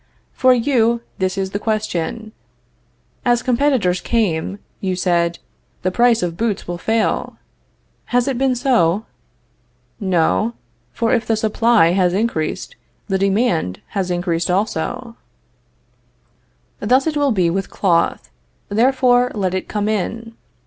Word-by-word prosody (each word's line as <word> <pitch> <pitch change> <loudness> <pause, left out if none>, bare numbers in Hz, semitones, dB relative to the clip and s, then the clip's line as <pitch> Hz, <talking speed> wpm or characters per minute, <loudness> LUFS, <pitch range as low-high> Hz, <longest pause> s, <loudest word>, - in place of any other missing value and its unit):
For 255 0 +4
you, 235 -2 +2 0.2
this 185 0 -1
is 190 -1 -2
the 205 - -2
question. 215 -1 -2 0.9
As 240 -1 +2
competitors 245 -8 +1
came, 195 -5 0 0.2
you 185 -1 -1
said: 170 -2 +1 0.5
The 185 - +1
price 235 0 +3
of 170 -2 -2
boots 215 0 -2
will 175 0 -4
fail. 220 +2 -1 0.7
Has 245 +1 +1
it 270 - 0
been 265 -1 +2
so? 225 - +2 0.9
No, 190 +3 +1 0.4
for 230 - 0
if 235 -2 0
the 225 - +2
supply 220 -3 +3
has 180 -1 +2
increased, 185 -6 -2 0.3
the 190 -1 +1
demand 195 - +1
has 190 -3 -2
increased 175 -1 -1
also. 205 +5 -2 1.6
Thus 255 +6 +2
will 290 -1 +2
it 235 - 0
be 175 -3 +2
with 195 +2 -2
cloth; 175 -4 0 0.4
therefore 245 +2 +3
let 190 -3 -1
it 185 - -3
come 210 -1 -2
in. 225 +2 -2
210 Hz, 130 wpm, -19 LUFS, 180-235 Hz, 1.6 s, For